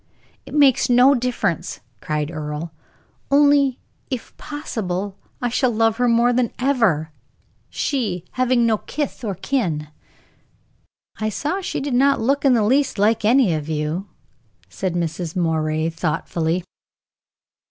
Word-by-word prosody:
"It - - -7
makes 275 -4 +4
no 250 +3 +6
difference," 240 - -1 0.2
cried 150 +3 -2
Earle; 155 +1 -5 0.6
"only, 280 -2 +4 0.3
if 255 -4 -5
possible, 205 -10 -4 0.3
I 245 - +1
shall 255 +2 +2
love 225 -1 +1
her 245 0 +2
more 235 +1 +3
than 245 -1 +1
ever, 225 - +1 0.6
she 210 - -2
having 255 -1 +2
no 220 -2 +2
kith 290 -4 -4
or 205 -4 -2
kin." 175 - -2 1.3
"I 215 0 0
saw 300 - -2
she - - -3
did 275 -1 -3
not 275 +3 +3
look 275 +5 +1
in 270 -3 +5
the 225 - +2
least 265 +3 +2
like 215 +3 +2
any 230 -4 +4
of 155 -1 -3
you," 155 +5 -2 0.6
said 180 - -3
Mrs. 170 -1 -3
Moray, 160 -2 0
thoughtfully. 165 +2 -1
225 Hz, 130 wpm, -21 LUFS, 165-255 Hz, 1.3 s, no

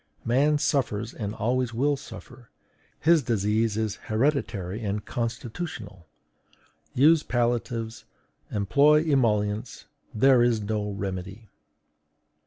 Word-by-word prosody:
Man 140 +6 +3
suffers 120 -7 -1
and 105 -2 -5
always 120 +1 -1
will 145 +4 +2
suffer; 120 -3 -12 0.5
his 165 0 +5
disease 110 -1 0
is 110 -2 -2
hereditary 110 - -1
and 105 0 -3
constitutional. 115 - -5 0.9
Use 155 +4 +5
palliatives, 120 -2 -2 0.5
employ 145 +9 +4
emollients; 110 -6 0 0.3
there 130 +2 +4
is 120 -2 +3
no 105 0 -2
remedy." 100 +2 -6
115 Hz, 95 wpm, -26 LUFS, 105-135 Hz, 0.9 s, his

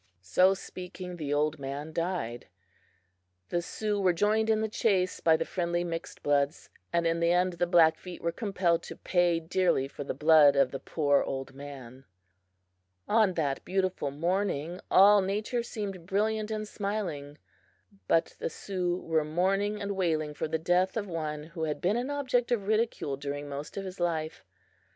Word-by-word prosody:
So 185 - +4
speaking, 180 -1 -8
the 150 -3 -4
old 150 +1 +1
man 140 +3 -5
died. 165 -10 -3 1.0
The 175 - 0
Sioux 210 +3 -2
were 185 -2 +3
joined 215 +5 +2
in 220 -1 +3
the 220 - 0
chase 195 -4 +1
by 160 -1 +4
the 165 - -2
friendly 175 -1 -1
mixedbloods, 145 -3 -1 0.2
and 170 0 +1
in 165 0 +1
the 170 0 +3
end 180 +1 +2
the 175 +1 0
Blackfeet 175 +1 +3
were 170 - -1
compelled 180 -4 0
to - - -9
pay 175 -2 +2
dearly 165 -4 +1
for 145 - -7
the 135 - -4
blood 150 -1 +6
of 135 -2 +3
the 135 - -4
poor 145 0 +1
old 135 0 -4
man. 135 -2 -10 1.0
On 210 -4 +3
that 140 -4 -1
beautiful 185 -5 -1
morning 170 +1 -1
all 200 +2 +7
Nature 210 +5 -1
seemed 200 -7 -6
brilliant 215 +2 0
and 215 -1 -3
smiling, 180 -10 -4 0.7
but 165 - +2
the - - -2
Sioux 180 0 -2
were 160 -1 +1
mourning 195 +6 0
and 200 -1 -3
wailing 160 -5 0
for 150 - -3
the 160 +1 -1
death 180 +5 +1
of 210 - -1
one 155 -3 -4
who 160 +1 -5
had 150 -1 -3
been 190 +4 +1
an 245 +3 -2
object 255 -4 0
of 215 -5 +1
ridicule 215 -10 0
during 145 +1 -5
most 145 +4 -7
of 195 - -3
his 185 0 -8
life. 160 -2 -2
175 Hz, 170 wpm, -29 LUFS, 150-195 Hz, 1.0 s, all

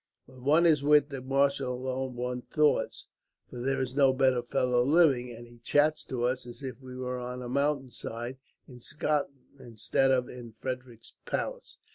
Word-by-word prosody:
When 130 -1 -16
one 155 +5 +4
is 155 -4 +5
with 145 0 +4
the 135 -2 -6
marshal 135 -1 +1
alone, 130 0 -3
one 125 0 -3
thaws; 150 +4 +1 0.5
for 125 - -7
there 135 +2 0
is 130 -1 -2
no 135 -2 +5
better 130 -2 +3
fellow 125 0 +1
living, 135 -4 +4
and 120 0 -10
he 120 0 -17
chats 150 +5 +2
to 125 -2 -3
us 125 0 -1
as 120 +2 -10
if 130 -1 -6
we 130 -1 -9
were 125 0 -3
on 125 0 -5
a - - -5
mountain 140 0 0
side 120 +3 -6 0.3
in 125 -2 -12
Scotland, 145 -1 -2
instead 120 +3 0
of 125 -2 +2
in 120 -2 -10
Frederick's 125 -3 -6
palace. - - -4
130 Hz, 180 wpm, -29 LUFS, 125-140 Hz, 0.5 s, is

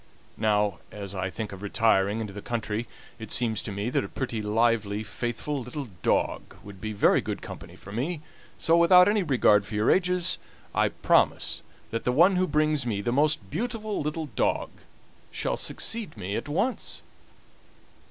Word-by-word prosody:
Now, 105 -3 +2
as 100 -2 -7
I 95 -1 -2
think 110 +2 -5
of 95 -1 -9
retiring 105 0 +2
into 105 -3 -5
the 105 - -7
country, 115 0 -3 0.3
it 110 -2 -8
seems 110 -4 +1
to - - -5
me 100 +4 -2
that - - +1
a 100 - -6
pretty, 120 -5 -3
lively, 110 -1 +1
faithful 120 +6 -3
little 125 +1 -6
dog - - 0
would 100 -2 -11
be 110 - -3
very 105 - +4
good - - -5
company - - -9
for 100 - -12
me; 145 - -2 0.4
so, 165 - +3
without 180 +2 +7
any 210 0 +3
regard 125 - +4
for 105 - -7
your 105 +2 +3
ages, 180 -1 +2 0.3
I - - +3
promise - - +2 0.3
that 115 - -2
the 125 - +1
one 170 +9 +5
who 185 0 +2
brings 150 -3 +2
me 110 -4 -1
the 120 - -1
most 150 +4 +2
beautiful 215 - -2
little 150 +1 -3
dog - - +1 0.6
shall - - -2
succeed 220 - -3
me 100 0 -3
at 145 - -4
once." 225 - -1
120 Hz, 170 wpm, -27 LUFS, 105-155 Hz, 0.6 s, without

